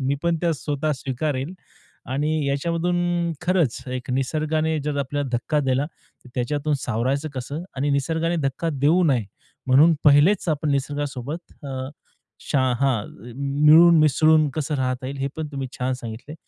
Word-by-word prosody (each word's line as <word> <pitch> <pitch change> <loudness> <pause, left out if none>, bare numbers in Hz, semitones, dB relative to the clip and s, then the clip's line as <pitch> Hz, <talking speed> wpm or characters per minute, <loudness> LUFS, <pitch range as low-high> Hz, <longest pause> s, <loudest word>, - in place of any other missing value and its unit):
मी 135 +1 0
पण 170 -1 +1
त्या 170 -1 +1
स्वतः 150 +1 -2
स्वीकारेल. 135 +4 -3 0.6
आणि 145 +4 0 0.2
याच्यामधून 170 +5 0 0.5
खरंच 175 -8 +1
एक 125 0 -5
निसर्गाने 155 +4 0
जर 150 -1 -2
आपल्याला 140 0 -2
धक्का 150 +5 0
दिला 135 0 +1
तर 140 -4 -21
त्याच्यातून 145 +4 -1
सावरायचं 130 +6 -1
कसं 140 +5 -5
आणि 140 +2 0
निसर्गाने 160 +4 0
धक्का 150 +5 -4
देऊ 150 +6 +3
नये 130 -8 +2 0.4
म्हणून 145 +6 +6
पहिलेच 150 +7 +5
आपण 155 -1 0
निसर्गासोबत 145 +2 -3
अ, 130 -1 -4 0.6
शा 140 - +1 0.2
हां. 130 -6 +1 0.3
मिळून 150 +5 +6
मिसळून 155 +1 +4
कसं 155 -1 -2
राहता 130 -1 -2
येईल. 140 +1 -5
हे 135 0 -1
पण 160 -1 -3
तुम्ही 135 -2 -4
छान 130 0 0
सांगितलंय. 120 +4 -8
145 Hz, 145 wpm, -23 LUFS, 130-155 Hz, 0.6 s, म्हणून